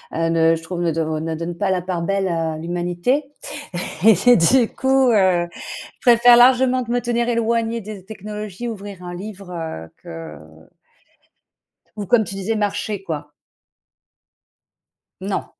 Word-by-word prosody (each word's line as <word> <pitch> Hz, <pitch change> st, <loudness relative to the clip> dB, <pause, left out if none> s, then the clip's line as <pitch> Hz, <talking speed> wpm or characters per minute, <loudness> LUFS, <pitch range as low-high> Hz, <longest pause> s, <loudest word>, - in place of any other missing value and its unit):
heu, 165 Hz, 0 st, 0 dB
ne 165 Hz, 0 st, +4 dB
je 165 Hz, -, -8 dB
trouve, 175 Hz, +1 st, -5 dB
ne 170 Hz, -, +1 dB, 0.3 s
ne 160 Hz, 0 st, -3 dB
donnent 170 Hz, +1 st, -5 dB
pas 200 Hz, -2 st, +1 dB
la 180 Hz, -2 st, 0 dB
part 180 Hz, -2 st, -3 dB
belle 195 Hz, +2 st, 0 dB
à 165 Hz, -2 st, -1 dB
l'humanité 175 Hz, -, -1 dB, 0.8 s
et-et 225 Hz, +3 st, +6 dB
du 230 Hz, +7 st, +4 dB
coup, 265 Hz, -1 st, +2 dB
heu, 185 Hz, -5 st, +3 dB
je -, -, -10 dB
préfère 240 Hz, -1 st, +7 dB
largement 255 Hz, +1 st, +5 dB
de 235 Hz, -, -8 dB
me 245 Hz, -, +1 dB
tenir 240 Hz, 0 st, 0 dB
éloignée 230 Hz, 0 st, 0 dB
des 205 Hz, -2 st, -9 dB
technologies 210 Hz, +2 st, -7 dB
ouvrir 200 Hz, -4 st, -8 dB
un 175 Hz, 0 st, -7 dB
livre, 195 Hz, -1 st, -8 dB
heu, 160 Hz, -, -6 dB
que 80 Hz, -2 st, -8 dB, 1.6 s
ou, 205 Hz, -1 st, -5 dB
comme 220 Hz, +2 st, +4 dB
tu 195 Hz, -, -7 dB
disais, 200 Hz, +3 st, -2 dB
marcher, 205 Hz, -1 st, -2 dB
quoi. 150 Hz, -4 st, -5 dB, 1.9 s
Non. -, -, -2 dB
195 Hz, 145 wpm, -21 LUFS, 175-230 Hz, 1.9 s, préfère